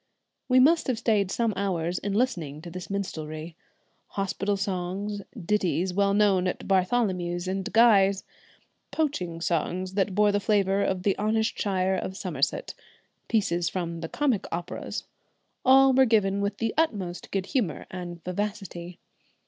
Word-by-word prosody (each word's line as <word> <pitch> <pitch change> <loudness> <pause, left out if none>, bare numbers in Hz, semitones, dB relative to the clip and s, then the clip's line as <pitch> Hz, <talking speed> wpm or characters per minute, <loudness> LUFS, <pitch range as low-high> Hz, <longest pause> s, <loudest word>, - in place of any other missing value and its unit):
We 255 0 +6
must 315 +6 +4
have 255 -3 0
stayed 210 -4 +1
some 230 +1 0
hours 180 -3 -1
in 200 0 -3
listening 180 - -1
to 170 - -8
this 180 +1 -7
minstrelsy. 160 -5 -5 0.5
Hospital 195 +1 -2
songs, 195 +2 -3 0.2
ditties 185 -2 +1
well 200 +1 +2
known 195 -3 +3
at 180 - -4
Bartholomew's 185 -3 +1
and 190 0 -2
Guy's; 200 -4 +5 0.7
poaching 180 - -2
songs 180 +2 -1
that 195 -1 0
bore 210 0 +4
the 205 - +1
flavour 200 -1 +2
of 185 -2 -1
the 200 -1 +2
honest 220 +1 +1
shire 190 -2 +1
of 190 +1 -4
Somerset; 175 - -2 0.5
pieces 175 -6 +1
from 170 -2 -3
the 165 - -5
comic 270 -9 0
operas; 170 +1 -4 0.6
all 265 +1 +6
were 265 +1 +6
given 200 -4 +2
with 200 +1 -1
the 225 -1 -1
utmost 200 - -1
good 195 -1 -2
humour 210 - -1
and 175 -2 -7
vivacity. 180 -2 -4
195 Hz, 145 wpm, -27 LUFS, 180-210 Hz, 0.7 s, We